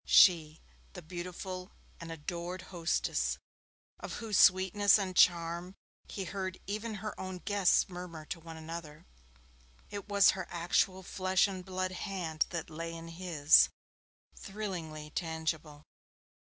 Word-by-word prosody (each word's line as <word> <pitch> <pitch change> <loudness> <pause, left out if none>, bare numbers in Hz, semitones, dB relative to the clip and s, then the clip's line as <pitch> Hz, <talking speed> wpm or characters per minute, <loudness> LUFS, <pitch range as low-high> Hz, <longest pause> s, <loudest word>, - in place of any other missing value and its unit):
She 160 -4 +6 0.3
the 180 -3 -9
beautiful 180 +2 -6 0.3
and 170 0 -7
adored 175 +3 -5
hostess, 170 -1 0 0.6
of - - -6
whose 220 -4 0
sweetness 190 +3 +6
and 190 -3 -3
charm 170 +1 +3 0.3
he 195 - -5
heard 185 -1 -4
even 215 +2 -3
her 215 - -2
own 185 -1 -5
guests 200 -3 +3
murmur 175 -4 -8
to 165 - -5
one 165 0 -10
another 160 0 -8 0.9
it 205 0 -6
was 200 -1 +6
her 190 -2 -5
actual 185 +2 +1
flesh 185 +1 +2
and 190 -2 -6
blood 185 0 -2
hand 175 -4 -2
that 165 -2 -5
lay 165 +1 -5
in 165 0 -8
his 165 -4 +5 0.7
thrillingly 170 -7 -6
tangible. 160 -2 -3
180 Hz, 125 wpm, -32 LUFS, 165-190 Hz, 0.9 s, She